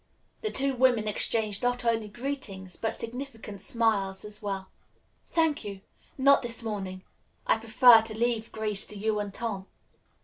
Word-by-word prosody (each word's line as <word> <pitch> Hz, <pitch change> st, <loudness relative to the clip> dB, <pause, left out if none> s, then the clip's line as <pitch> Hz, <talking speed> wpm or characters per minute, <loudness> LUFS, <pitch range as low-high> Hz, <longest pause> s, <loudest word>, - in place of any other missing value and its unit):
The 435 Hz, -, -1 dB
two 275 Hz, -5 st, +1 dB
women 245 Hz, -4 st, +3 dB
exchanged 210 Hz, -1 st, +1 dB
not 245 Hz, 0 st, 0 dB
only 225 Hz, -2 st, +1 dB
greetings 210 Hz, -6 st, -5 dB
but 225 Hz, -, -2 dB
significant 230 Hz, -4 st, -7 dB
smiles 205 Hz, -4 st, 0 dB
as 210 Hz, 0 st, -8 dB
well. 195 Hz, -2 st, -4 dB, 0.6 s
"Thank 320 Hz, -3 st, +1 dB
you; 200 Hz, -2 st, -7 dB, 0.4 s
not 280 Hz, +1 st, +6 dB
this 235 Hz, -1 st, -4 dB
morning. 190 Hz, -4 st, -4 dB, 0.4 s
I -, -, +3 dB
prefer 230 Hz, +1 st, +7 dB
to 220 Hz, -1 st, -7 dB
leave 230 Hz, -1 st, 0 dB
Grace 210 Hz, -2 st, -2 dB
to 210 Hz, -, -7 dB
you 215 Hz, +1 st, 0 dB
and 205 Hz, -1 st, -3 dB
Tom." 200 Hz, -3 st, -4 dB
220 Hz, 150 wpm, -28 LUFS, 205-245 Hz, 0.6 s, prefer